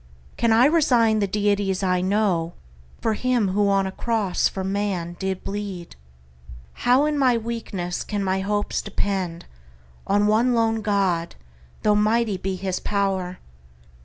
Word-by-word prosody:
Can 235 Hz, -, +1 dB
I 230 Hz, +3 st, +6 dB
resign 245 Hz, -8 st, +3 dB
the 200 Hz, -, +1 dB
deities 200 Hz, -1 st, 0 dB
I 180 Hz, -1 st, +1 dB
know 185 Hz, -4 st, 0 dB, 0.5 s
For 225 Hz, -, +1 dB
him 240 Hz, -3 st, +1 dB
who 200 Hz, +2 st, +2 dB
on 195 Hz, -1 st, +2 dB
a 190 Hz, -, -3 dB
cross 215 Hz, -3 st, 0 dB
for 190 Hz, -, -5 dB
man 190 Hz, -3 st, -2 dB
did 190 Hz, -1 st, -3 dB
bleed? 195 Hz, -4 st, -6 dB, 0.8 s
How 255 Hz, +4 st, +3 dB
in 300 Hz, -1 st, 0 dB
my 255 Hz, -3 st, +4 dB
weakness 220 Hz, -6 st, -4 dB
can 205 Hz, -2 st, -3 dB
my 190 Hz, 0 st, 0 dB
hopes 205 Hz, +2 st, -1 dB
depend 190 Hz, -4 st, -3 dB, 0.6 s
On 205 Hz, +1 st, +3 dB
one 230 Hz, +4 st, +3 dB
lone 225 Hz, -1 st, +1 dB
God, 190 Hz, -5 st, 0 dB, 0.5 s
though 210 Hz, -, +4 dB
mighty 215 Hz, 0 st, +2 dB
be 190 Hz, +1 st, -3 dB
his 185 Hz, 0 st, -3 dB
pow'r? 190 Hz, -3 st, -1 dB
205 Hz, 145 wpm, -23 LUFS, 190-225 Hz, 0.8 s, I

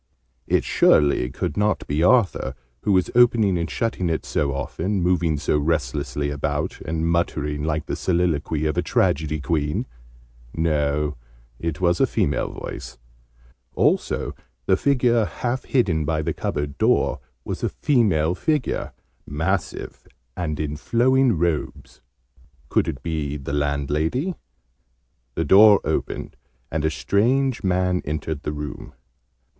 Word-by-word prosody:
It -, -, +2 dB
surely 70 Hz, -4 st, +3 dB
could -, -, -3 dB
not 105 Hz, +1 st, 0 dB
be 75 Hz, +2 st, -1 dB
Arthur, 100 Hz, +2 st, +3 dB, 0.3 s
who 105 Hz, -, 0 dB
was 95 Hz, -2 st, +2 dB
opening 115 Hz, -5 st, +4 dB
and 85 Hz, -2 st, -2 dB
shutting 110 Hz, -6 st, -1 dB
it 80 Hz, -, -2 dB
so 70 Hz, -2 st, 0 dB
often, 80 Hz, +8 st, -2 dB
moving 85 Hz, -3 st, +1 dB
so 75 Hz, +1 st, +1 dB
restlessly 70 Hz, -2 st, -1 dB
about, 70 Hz, -1 st, -2 dB
and 80 Hz, +1 st, -2 dB
muttering 75 Hz, -3 st, 0 dB
like 80 Hz, 0 st, -1 dB
the -, -, -3 dB
soliloquy 80 Hz, -4 st, 0 dB
of 75 Hz, -2 st, 0 dB
a -, -, +3 dB
tragedy 75 Hz, 0 st, +1 dB
queen! 75 Hz, 0 st, -1 dB, 0.7 s
No, 75 Hz, -2 st, 0 dB, 0.4 s
it 85 Hz, +1 st, -3 dB
was 85 Hz, -1 st, +2 dB
a -, -, +5 dB
female 75 Hz, -, 0 dB
voice. -, -, -8 dB, 0.8 s
Also -, -, +1 dB, 0.3 s
the 95 Hz, -, +4 dB
figure 120 Hz, -1 st, +2 dB
half 125 Hz, +4 st, -3 dB
hidden 95 Hz, -, +1 dB
by 80 Hz, +1 st, -1 dB
the -, -, -1 dB
cupboard 75 Hz, -1 st, -3 dB
door -, -, +2 dB, 0.3 s
was -, -, -4 dB
a -, -, 0 dB
female 95 Hz, -, +2 dB
figure, 150 Hz, -, -1 dB, 0.3 s
massive, 80 Hz, +1 st, -3 dB, 0.3 s
and 75 Hz, -4 st, -3 dB
in 75 Hz, -1 st, -3 dB
flowing 130 Hz, -, +3 dB
robes. 85 Hz, -2 st, -2 dB, 0.7 s
Could -, -, +2 dB
it 65 Hz, -, -5 dB
be 75 Hz, -3 st, -2 dB
the 70 Hz, 0 st, -6 dB
landlady? 75 Hz, -, 0 dB, 1.0 s
The 80 Hz, -, 0 dB
door 100 Hz, +4 st, +7 dB
opened, -, -, -3 dB, 0.3 s
and 75 Hz, -1 st, -1 dB
a 80 Hz, -, +2 dB
strange 115 Hz, -, +1 dB
man 90 Hz, -1 st, +1 dB
entered 75 Hz, 0 st, -3 dB
the -, -, -3 dB
room. 75 Hz, 0 st, -7 dB
80 Hz, 135 wpm, -23 LUFS, 75-100 Hz, 1.0 s, door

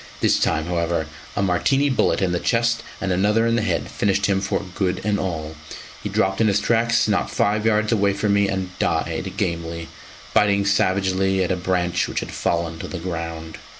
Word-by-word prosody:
This -, -, +3 dB
time, 80 Hz, 0 st, +1 dB
however, 85 Hz, -2 st, -1 dB, 0.3 s
a 100 Hz, -, 0 dB
Martini 135 Hz, +10 st, +2 dB
bullet 130 Hz, -6 st, +1 dB
in 90 Hz, -, +1 dB
the 90 Hz, -, 0 dB
chest 115 Hz, +2 st, +1 dB, 0.2 s
and 95 Hz, -, -2 dB
another 105 Hz, +5 st, +2 dB
in 115 Hz, 0 st, +2 dB
the 115 Hz, -, +1 dB
head 110 Hz, -, -1 dB
finished 100 Hz, 0 st, 0 dB
him 95 Hz, -1 st, +1 dB
for 100 Hz, 0 st, -2 dB
good 95 Hz, -1 st, -1 dB
and 105 Hz, 0 st, 0 dB
all; 80 Hz, -4 st, -3 dB, 0.5 s
he -, -, -4 dB
dropped 95 Hz, +2 st, +1 dB
in 110 Hz, -, +4 dB
his 100 Hz, -1 st, +3 dB
tracks 115 Hz, +2 st, +2 dB
not 105 Hz, -1 st, +1 dB
five 105 Hz, +2 st, +1 dB
yards 110 Hz, 0 st, +2 dB
away 100 Hz, -3 st, +2 dB
from 100 Hz, +1 st, 0 dB
me, 100 Hz, -1 st, +3 dB
and 95 Hz, -1 st, -3 dB
died -, -, -1 dB
gamely, 85 Hz, -1 st, -3 dB, 0.4 s
biting 100 Hz, -1 st, +3 dB
savagely 95 Hz, -1 st, +2 dB
at 90 Hz, -, -1 dB
a -, -, +2 dB
branch 90 Hz, -1 st, 0 dB
which -, -, -2 dB
had -, -, -6 dB
fallen 85 Hz, -1 st, -1 dB
to -, -, -5 dB
the 95 Hz, -, -5 dB
ground. 80 Hz, -2 st, -5 dB
95 Hz, 195 wpm, -22 LUFS, 90-105 Hz, 0.5 s, in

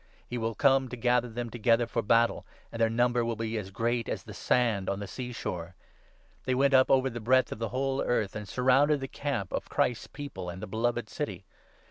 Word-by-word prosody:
He 120 Hz, -, -4 dB
will 115 Hz, 0 st, -2 dB
come 135 Hz, +1 st, +3 dB
to 125 Hz, -, -5 dB
gather 125 Hz, 0 st, +2 dB
them 120 Hz, 0 st, -5 dB
together 120 Hz, +1 st, +2 dB
for 115 Hz, -, -2 dB
battle; 115 Hz, +2 st, +2 dB, 0.3 s
and 115 Hz, -, -5 dB
their 115 Hz, -, +4 dB
number 120 Hz, +1 st, +2 dB
will 115 Hz, 0 st, -1 dB
be 115 Hz, 0 st, -3 dB
as 95 Hz, -2 st, -7 dB
great 115 Hz, +3 st, -1 dB
as -, -, -3 dB
the -, -, -10 dB
sand 115 Hz, -6 st, +1 dB
on 100 Hz, -, -2 dB
the 100 Hz, -, -4 dB
sea 125 Hz, +5 st, -6 dB
shore. 90 Hz, -6 st, -5 dB, 0.7 s
They 130 Hz, -, +1 dB
9 -, -, 0 dB
went 140 Hz, +1 st, +3 dB
up 130 Hz, 0 st, +6 dB
over 135 Hz, 0 st, +4 dB
the 120 Hz, -2 st, -4 dB
breadth 130 Hz, +3 st, +3 dB
of -, -, -5 dB
the 115 Hz, -1 st, -2 dB
whole 135 Hz, +3 st, -1 dB
earth, 110 Hz, -5 st, 0 dB
and 105 Hz, -1 st, -5 dB
surrounded 135 Hz, +6 st, +3 dB
the 135 Hz, -, -4 dB
camp 135 Hz, -11 st, -3 dB
of -, -, -3 dB
Christ's 120 Hz, -, 0 dB
People 135 Hz, -11 st, -7 dB
and 90 Hz, +1 st, -7 dB
the 105 Hz, -, -5 dB
beloved 115 Hz, +2 st, -1 dB
city. 100 Hz, -, -5 dB
120 Hz, 225 wpm, -29 LUFS, 110-130 Hz, 0.7 s, up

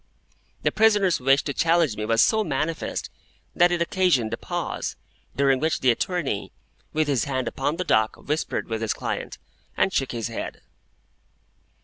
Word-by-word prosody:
The -, -, +2 dB
prisoner's 210 Hz, -5 st, +3 dB
wish 135 Hz, +2 st, +3 dB
to 140 Hz, -, -3 dB
challenge 165 Hz, -5 st, +2 dB
me 105 Hz, -, -3 dB
was 115 Hz, +1 st, +4 dB
so 220 Hz, 0 st, +3 dB
manifest, 155 Hz, -1 st, -2 dB, 0.4 s
that 175 Hz, 0 st, +5 dB
it 175 Hz, -1 st, +2 dB
occasioned 170 Hz, -11 st, +1 dB
a -, -, +1 dB
pause, -, -, -4 dB, 0.4 s
during 135 Hz, -1 st, +3 dB
which 160 Hz, +3 st, 0 dB
the 130 Hz, -, +5 dB
attorney, 145 Hz, -, -2 dB, 0.4 s
with 155 Hz, 0 st, 0 dB
his 135 Hz, -5 st, +1 dB
hand 130 Hz, -3 st, -2 dB
upon 145 Hz, +3 st, -1 dB
the 180 Hz, -, -2 dB
dock, 110 Hz, -9 st, +2 dB
whispered 150 Hz, +2 st, -3 dB
with 110 Hz, -1 st, -3 dB
his 110 Hz, -, 0 dB
client, -, -, -4 dB, 0.4 s
and 190 Hz, -, +2 dB
shook 135 Hz, -, 0 dB
his 115 Hz, -1 st, -3 dB
head. 115 Hz, -, -6 dB
140 Hz, 160 wpm, -24 LUFS, 120-170 Hz, 0.4 s, that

